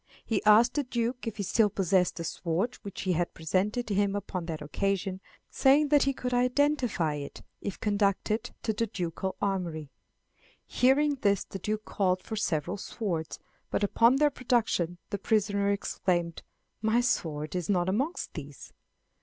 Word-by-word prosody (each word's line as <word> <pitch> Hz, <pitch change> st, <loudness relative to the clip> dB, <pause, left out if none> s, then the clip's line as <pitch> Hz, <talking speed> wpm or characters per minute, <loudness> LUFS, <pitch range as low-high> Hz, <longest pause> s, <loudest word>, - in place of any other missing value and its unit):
He 220 Hz, -3 st, 0 dB
asked 220 Hz, +3 st, +6 dB
the 290 Hz, -, 0 dB
Duke 245 Hz, 0 st, -2 dB
if 220 Hz, -1 st, -4 dB
he 200 Hz, -, -2 dB
still 210 Hz, +2 st, +3 dB
possessed 185 Hz, -2 st, +1 dB
the 170 Hz, -, -5 dB
sword 175 Hz, +8 st, -1 dB
which 200 Hz, -, -7 dB
he 185 Hz, -2 st, +1 dB
had 175 Hz, +1 st, -1 dB
presented 195 Hz, +9 st, -1 dB
him 200 Hz, 0 st, +1 dB
upon 185 Hz, -4 st, -4 dB
that 160 Hz, -2 st, -4 dB
occasion, 190 Hz, +5 st, -2 dB, 0.3 s
saying 285 Hz, +2 st, +4 dB
that 290 Hz, -1 st, +5 dB
he 275 Hz, -, +3 dB
could 250 Hz, -1 st, -4 dB
identify 250 Hz, -, +2 dB
it 145 Hz, -1 st, -7 dB, 0.2 s
if 200 Hz, -, -5 dB
conducted 205 Hz, +1 st, 0 dB
to 220 Hz, -, 0 dB
the 230 Hz, +2 st, -1 dB
ducal 185 Hz, -2 st, -3 dB
armoury. 170 Hz, -7 st, -2 dB, 0.7 s
Hearing 280 Hz, +2 st, +3 dB
this 200 Hz, -2 st, +2 dB
the 195 Hz, -, -8 dB
Duke 215 Hz, +3 st, -3 dB
called 185 Hz, -2 st, 0 dB
for 220 Hz, -, -5 dB
several 180 Hz, -3 st, -1 dB
swords, 180 Hz, -6 st, -4 dB, 0.3 s
but -, -, -1 dB
upon 230 Hz, +5 st, +4 dB
their 295 Hz, +1 st, +3 dB
production 225 Hz, -10 st, 0 dB
the 200 Hz, -, -2 dB
prisoner 200 Hz, -1 st, +1 dB
exclaimed, 175 Hz, -4 st, -1 dB, 0.4 s
"My 220 Hz, +2 st, +3 dB
sword 155 Hz, -, -1 dB
is 180 Hz, 0 st, -2 dB
not 180 Hz, -3 st, +2 dB
amongst 265 Hz, -, -1 dB
these!" 145 Hz, -3 st, -9 dB
200 Hz, 160 wpm, -29 LUFS, 180-235 Hz, 0.7 s, asked